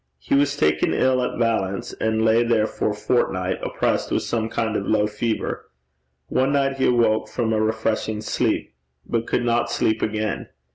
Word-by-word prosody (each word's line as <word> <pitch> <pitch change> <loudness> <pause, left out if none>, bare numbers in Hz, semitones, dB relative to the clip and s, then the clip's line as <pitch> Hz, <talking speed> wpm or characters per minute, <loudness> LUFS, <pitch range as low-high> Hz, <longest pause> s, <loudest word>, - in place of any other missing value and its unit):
He 65 - -4
was 145 +1 +3
taken 75 0 +2
ill 130 -1 +2
at 125 - -2
Valence 105 -5 -1
and 110 0 0
lay 110 +1 +4
there 115 -2 +2
for 110 - -2
a 105 - -2
fortnight, 95 -5 0
oppressed - - -1
with - - 0
some 115 -1 -1
kind 110 -2 -1
of 100 - -2
low 105 -1 +3
fever. 110 +2 -3 0.6
One 130 - +1
night 135 -1 +1
he 130 - +2
awoke 115 -3 +2
from 115 -2 -1
a 110 - +1
refreshing 110 -1 -1
sleep, - - -1 0.3
but 115 0 -2
could 120 - 0
not 120 0 +1
sleep 110 -2 0
again. 110 -1 -2
110 Hz, 180 wpm, -23 LUFS, 110-120 Hz, 0.6 s, lay